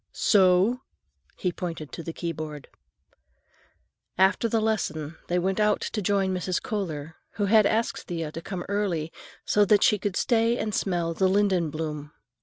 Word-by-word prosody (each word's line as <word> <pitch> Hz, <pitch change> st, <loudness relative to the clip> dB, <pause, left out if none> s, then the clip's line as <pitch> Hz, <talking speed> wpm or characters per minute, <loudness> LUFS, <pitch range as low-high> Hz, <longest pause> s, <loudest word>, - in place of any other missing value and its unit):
"So?" 195 Hz, +5 st, +4 dB, 0.6 s
he 180 Hz, -, -1 dB
pointed 165 Hz, -4 st, -6 dB
to -, -, -6 dB
the 165 Hz, -, -5 dB
keyboard. 155 Hz, -4 st, -6 dB, 1.5 s
After 190 Hz, +5 st, +3 dB
the 225 Hz, -, +2 dB
lesson 170 Hz, -8 st, -2 dB
they 175 Hz, -, 0 dB
went 190 Hz, +3 st, 0 dB
out 210 Hz, 0 st, +3 dB
to 215 Hz, -, -3 dB
join 195 Hz, -1 st, +1 dB
Mrs. 180 Hz, 0 st, -1 dB
Kohler, 160 Hz, -, -4 dB, 0.2 s
who 205 Hz, -, -1 dB
had 210 Hz, 0 st, +5 dB
asked 225 Hz, +2 st, -1 dB
Thea 165 Hz, -3 st, -3 dB
to 165 Hz, -, -7 dB
come 180 Hz, 0 st, -5 dB
early, 185 Hz, -6 st, -1 dB, 0.3 s
so 210 Hz, -, +4 dB
that 205 Hz, 0 st, +4 dB
she 210 Hz, -, +4 dB
could 200 Hz, -1 st, -2 dB
stay 230 Hz, 0 st, +2 dB
and 215 Hz, -3 st, -2 dB
smell 175 Hz, -4 st, 0 dB
the 190 Hz, +3 st, +2 dB
linden 190 Hz, -4 st, +2 dB
bloom. 150 Hz, -1 st, -5 dB
185 Hz, 160 wpm, -26 LUFS, 165-205 Hz, 1.5 s, had